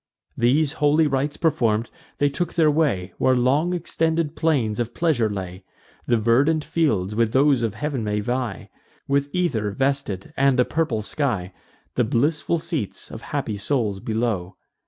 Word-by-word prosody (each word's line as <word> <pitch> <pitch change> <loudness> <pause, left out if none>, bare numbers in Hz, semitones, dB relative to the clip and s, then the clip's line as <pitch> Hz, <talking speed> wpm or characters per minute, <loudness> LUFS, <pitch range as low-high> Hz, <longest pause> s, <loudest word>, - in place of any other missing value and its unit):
These 140 +5 +2
holy 150 +2 +4
rites 145 0 -1
perform'd, 120 - +1 0.3
they 145 - +3
took 175 +3 -3
their 155 -3 +4
way 120 - 0
Where 130 - +3
long 135 +8 +2
extended 165 -2 -1
plains 130 -10 +1
of 120 0 -3
pleasure 150 -10 +1
lay: 95 -2 -6 0.4
The 120 - +3
verdant 135 +8 +2
fields 105 - 0
with 115 +1 +1
those 135 -1 +4
of 110 -3 -1
heav'n 140 -2 -2
may 105 0 -1
vie, 120 +3 -3 0.4
With 140 +1 +1
ether 140 - 0
vested, 135 -4 -2
and 135 -1 +3
a 125 - +5
purple 145 -10 -1
sky; 105 -9 -2 0.4
The 125 - +2
blissful 150 +9 +1
seats 155 - -4
of - - -8
happy 105 - -3
souls 105 -3 -1
below. 110 -4 -2
130 Hz, 155 wpm, -23 LUFS, 110-150 Hz, 0.4 s, a